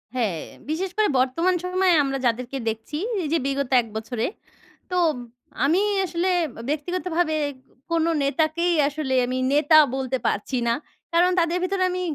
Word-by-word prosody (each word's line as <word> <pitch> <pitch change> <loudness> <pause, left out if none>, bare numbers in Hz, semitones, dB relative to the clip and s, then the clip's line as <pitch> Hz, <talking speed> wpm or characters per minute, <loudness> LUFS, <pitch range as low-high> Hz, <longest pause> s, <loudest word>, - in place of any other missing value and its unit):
হ্যাঁ, 215 -9 0 0.3
বিশেষ 355 +5 -1
করে 430 -1 +4
বর্তমান 330 +9 +2
সময়ে 365 0 +2
আমরা 270 -1 -1
যাদেরকে 245 +3 -1
দেখছি। 225 +7 -5 0.3
এই - - -2
যে 330 - +4
বিগত 275 -1 -1
১ 230 - -11
বছরে। 225 +1 -3 0.7
তো 360 - 0 0.7
আমি 335 +7 +3 0.2
আসলে 350 +1 -1 0.4
ব্যক্তিগতভাবে 340 +1 -1 0.6
কোনো 335 0 +2
নেতাকেই 315 +4 +1
আসলে 290 -2 -3
আমি 255 +1 -2 0.2
নেতা 300 +2 +5 0.2
বলতে 265 -1 -1
পারছি 230 +6 -1
না। 230 - +3 0.4
কারণ 350 +2 +4
তাদের 340 +1 +1
ভিতরে 375 0 0
আমি 365 0 -2
310 Hz, 145 wpm, -24 LUFS, 260-350 Hz, 0.7 s, নেতা